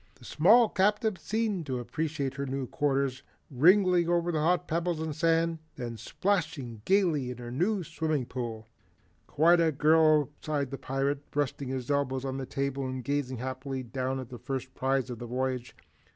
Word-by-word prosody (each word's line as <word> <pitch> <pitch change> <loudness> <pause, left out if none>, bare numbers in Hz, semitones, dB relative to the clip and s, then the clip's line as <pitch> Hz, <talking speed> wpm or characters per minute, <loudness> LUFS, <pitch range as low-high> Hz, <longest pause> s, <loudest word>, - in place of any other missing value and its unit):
The 120 - -17
small 220 - +5
captive 210 +1 +1
seemed 215 -7 -1
to 130 -2 -1
appreciate 140 +3 -3
her 140 0 -4
new 135 0 -2
quarters, 135 -1 0 0.3
wriggling 180 +4 +4
over 175 0 +2
the 155 - 0
hot 175 +3 +1
pebbles 170 0 -1
and 160 -2 -3
sand, 165 0 +2 0.2
then 120 -3 -5
splashing 135 - -2
gaily 175 -9 +2
in 125 - -6
her 165 - -1
swimming 155 -4 -2
pool. 115 -3 -5 0.6
"Quite 170 +4 +4
a 165 -1 +3
girl!" 155 0 +4
sighed 145 -4 -2
the 135 - -5
pirate, 135 +2 -1
resting 145 -2 -1
his 130 0 -3
elbows 135 -2 0
on 135 0 -3
the 135 -1 -5
table 140 0 -2
and 130 -1 -4
gazing 140 -1 -1
happily 130 +1 -4
down 130 +2 -3
at 130 -2 -7
the 125 -2 -9
first 130 -1 -5
prize 135 -1 0
of 120 - -6
the 120 - -6
voyage. 125 0 -2
140 Hz, 170 wpm, -29 LUFS, 130-165 Hz, 0.6 s, small